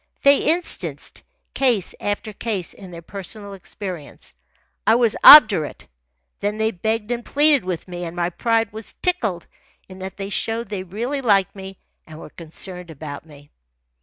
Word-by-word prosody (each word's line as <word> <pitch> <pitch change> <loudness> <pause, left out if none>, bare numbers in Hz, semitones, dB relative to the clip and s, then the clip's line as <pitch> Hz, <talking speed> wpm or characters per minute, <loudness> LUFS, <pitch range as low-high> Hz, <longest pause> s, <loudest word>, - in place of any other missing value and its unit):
They 280 0 +7
instanced 340 +2 -2 0.3
case 240 -9 +1
after 205 +1 -3
case 200 -4 -3
in 190 -2 -12
their 170 -1 -10
personal 200 +3 -8
experience. 185 - -8 0.5
I 220 - +6
was 235 -3 +3
obdurate. 215 - +8 0.5
Then 205 +1 -2
they 220 0 +1
begged 220 +3 -2
and 240 0 -2
pleaded 290 0 +3
with 180 -1 -4
me, 175 -1 -6
and 170 0 -7
my 175 0 -1
pride 225 +2 0
was 220 0 -7
tickled 220 - -2 0.4
in 185 0 -12
that 190 0 -7
they 195 0 -6
showed 225 +1 -2
they 200 -3 -4
really 235 +10 -4
liked 200 -6 +2
me 190 -1 -9 0.3
and 155 -1 -11
were 150 - -11
concerned 180 +2 -6
about 155 0 -9
me. 145 -1 -17
200 Hz, 160 wpm, -21 LUFS, 180-225 Hz, 0.5 s, obdurate